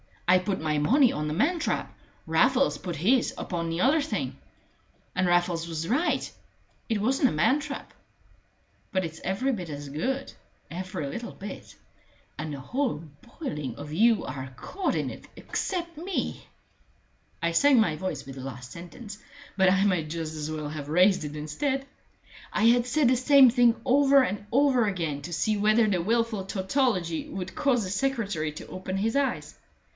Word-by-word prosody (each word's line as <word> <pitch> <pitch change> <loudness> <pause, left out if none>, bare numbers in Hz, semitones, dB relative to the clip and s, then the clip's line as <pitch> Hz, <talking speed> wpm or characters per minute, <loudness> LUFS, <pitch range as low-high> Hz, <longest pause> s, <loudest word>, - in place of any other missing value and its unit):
I 180 +1 +6
put 185 -1 -2
my 155 -1 0
money 250 - +4
on 150 0 -3
the 150 - -2
man 325 - +1
trap. 325 - -2 0.3
Raffles 255 +12 +3
put 180 -2 -5
his 235 - +2
upon 170 -2 -3
the 165 +2 -2
other 295 +5 +4
thing. 295 - -3 0.8
And 180 0 +1
Raffles 175 -1 +1
was 165 0 -4
right 300 +9 +1 0.6
it 220 -3 0
wasn't 260 +4 +3
a - - 0
man 170 - +3
trap. 285 -2 -7 1.0
But 185 -1 +1
it's 160 -1 -6
every 195 +9 0
bit 185 -9 -4
as 145 -1 -6
good 260 - -2 0.4
every 185 -2 -4
little 235 +12 -6
bit 195 0 -9 0.6
and 155 0 -4
the 140 -2 -6
whole 245 - -2 0.4
boiling 150 - -4
of 145 +2 -8
you 225 +5 +4
are 130 0 -6
caught 380 - -2
in - - -1
it - - -10
except 345 -4 -3
me!" 355 +3 -3 1.0
I 170 - +2
sank 275 +10 +5
my 180 -8 +2
voice 185 -1 -4
with 135 0 -9
the 135 - -7
last 125 -1 -8
sentence, 200 +5 -9 0.4
but 190 -1 +5
I 190 +1 +3
might 180 -6 +1
just 160 -1 -4
as 155 -1 -4
well 155 -1 -4
have 145 -1 -6
raised 180 +1 +4
it 150 0 -6
instead. 265 - -2 0.7
I 210 - +1
had 240 +1 +4
said 270 0 +3
the 255 - +3
same 270 0 +7
thing 240 -1 +4
over 275 +1 +5
and 205 -4 -3
over 260 -3 +4
again 165 -7 -2
to 175 - -6
see 210 +6 +1
whether 215 +2 +4
the 185 -4 +1
wilful 225 0 0
tautology 190 - 0
would 190 -1 -6
cause 250 -5 +1
the 185 - -4
secretary 200 - -1
to - - -9
open 185 +1 -5
his 225 +5 0
eyes. 280 -1 -1
195 Hz, 175 wpm, -27 LUFS, 160-255 Hz, 1.0 s, same